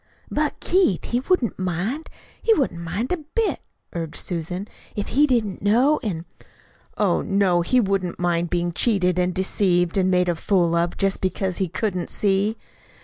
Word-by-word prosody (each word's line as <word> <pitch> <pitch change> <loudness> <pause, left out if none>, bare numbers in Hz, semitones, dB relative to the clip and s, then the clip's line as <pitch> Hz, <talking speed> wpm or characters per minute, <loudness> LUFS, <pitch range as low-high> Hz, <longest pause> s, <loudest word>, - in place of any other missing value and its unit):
"But, 300 0 -1
Keith, 355 - +2
he 240 - +2
wouldn't 265 - 0
mind; 185 - -2 0.3
he 450 - +4
wouldn't 185 - -1
mind 200 - -3
a 360 - +1
bit," 355 +9 -2 0.3
urged 165 -2 -4
Susan, 180 +3 -4 0.3
"if 205 - -3
he 295 +3 +4
didn't 230 -7 0
know 245 +9 +3
an' 175 -9 -3 0.4
" - - -32 0.3
"Oh, - - +2
no, 195 -3 +2
he 250 +9 +3
wouldn't 195 -5 0
mind 175 -1 0
being 175 0 0
cheated 180 -4 +2
and 180 0 +2
deceived 180 -1 +1
and 185 0 +2
made 180 -1 +3
a 175 - +2
fool 170 0 +1
of, 170 0 0
just 195 -1 0
because 185 -1 -1
he 190 - 0
couldn't 185 0 -2
see!" 205 +2 +1
190 Hz, 170 wpm, -23 LUFS, 175-230 Hz, 0.4 s, he